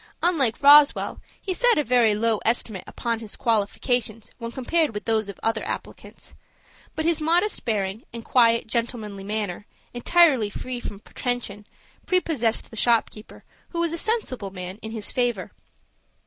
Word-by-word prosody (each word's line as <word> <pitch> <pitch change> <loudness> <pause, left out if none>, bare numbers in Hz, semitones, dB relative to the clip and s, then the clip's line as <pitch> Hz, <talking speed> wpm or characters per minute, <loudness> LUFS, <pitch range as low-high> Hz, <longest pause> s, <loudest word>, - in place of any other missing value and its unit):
Unlike 290 -8 +1
Roswell, 290 +1 +6 0.2
he 380 - -3
set 485 +5 +3
a 300 - +2
very 235 -4 +3
low 220 0 +1
estimate 225 -4 -1
upon 230 -2 -3
his 220 -3 -6
qualifications 225 0 -1
when 230 -1 -5
compared 285 +1 0
with 210 - -5
those 220 -2 0
of 200 - -9
other 225 -1 0
applicants. - - -8 0.6
But 315 - -2
his 330 -1 +1
modest 345 +7 +1
bearing, 210 -2 -2
and 230 -1 -8
quiet, 230 -2 +4
gentlemanly 220 -4 -3
manner, 205 -1 -4 0.3
entirely 260 -3 +4
free 250 +4 -5
from 205 -4 -7
pretension, 225 -4 -4 0.4
prepossessed 305 -11 +1
the - - -10
shop 230 0 +3
keeper, 215 +1 -13 0.3
who 340 - -4
was 335 -1 0
a - - -2
sensible 265 - -2
man, 185 0 -7
in 220 - -6
his 220 -2 -4
favor. 240 -7 -1
230 Hz, 155 wpm, -24 LUFS, 215-280 Hz, 0.6 s, Roswell